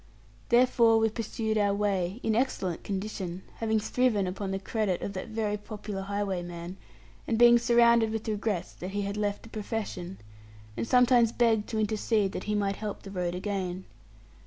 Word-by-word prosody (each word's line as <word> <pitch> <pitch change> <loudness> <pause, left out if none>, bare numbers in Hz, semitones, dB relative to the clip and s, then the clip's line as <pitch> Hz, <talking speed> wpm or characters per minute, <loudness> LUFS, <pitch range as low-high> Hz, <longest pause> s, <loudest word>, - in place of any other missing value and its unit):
Therefore 235 -2 +5
we 225 0 +3
pursued 220 0 -2
our 200 -1 +2
way, 200 -1 -1
in 220 - +1
excellent 220 -8 -1
condition, 190 -2 -4
having 220 -1 +1
thriven 220 -3 +1
upon 190 +2 -4
the 195 - -1
credit 195 -1 -1
of 200 - -4
that 190 +4 -5
very 215 -2 -1
popular 210 -1 -6
highwayman, 185 -3 -4 0.5
and 225 - +1
being 240 0 +7
surrounded 235 -1 +4
with 220 0 -4
regrets 210 -3 -2
that 180 - -7
he 205 - 0
had 200 0 -3
left 205 -1 -2
the 230 - -12
profession, 205 -4 -5 0.6
and - - -3
sometimes 245 -2 +5
begged 225 -3 +2
to 225 - -2
intercede 215 -1 +1
that - - -5
he 210 - -1
might 200 -1 0
help 210 -2 -5
the 195 - -9
road 180 -2 -2
again. 185 -1 -3
210 Hz, 170 wpm, -28 LUFS, 195-225 Hz, 0.6 s, being